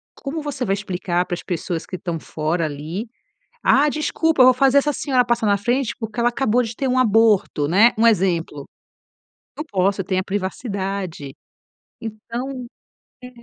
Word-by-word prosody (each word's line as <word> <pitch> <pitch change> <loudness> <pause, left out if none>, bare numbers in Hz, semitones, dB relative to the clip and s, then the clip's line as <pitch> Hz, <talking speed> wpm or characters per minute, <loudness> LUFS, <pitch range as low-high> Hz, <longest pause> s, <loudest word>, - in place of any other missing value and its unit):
como 300 +3 -5
você 285 -4 -3
vai 195 - +1
explicar 180 -3 -2
para 175 - -3
as - - -9
pessoas 175 -2 -3
que - - -6
estão 170 -2 -4
fora 155 +2 -2
ali. 155 +9 -5 0.6
Ah, 290 +2 +4
desculpa, 310 0 +1
eu 255 - +8
vou 255 - +7
fazer 270 +2 +4
essa 295 +1 +1
senhora 260 -3 +1
passar 240 -2 0
na 200 -1 +4
frente, 240 +4 0
porque 225 0 -4
ela 240 - +4
acabou 245 0 +1
de 225 0 -5
ter 270 - -1
um 255 0 +1
aborto, 220 - +3
né? 215 +8 +5
Um 230 - +4
exemplo. 170 -9 +1 0.9
Não 305 - -4
posso, 195 -7 0
tem 185 0 -1
a 185 - -1
privacidade. 190 - -4 0.7
Então 240 +4 -6 0.6
é 250 - -8
215 Hz, 170 wpm, -21 LUFS, 185-255 Hz, 0.9 s, eu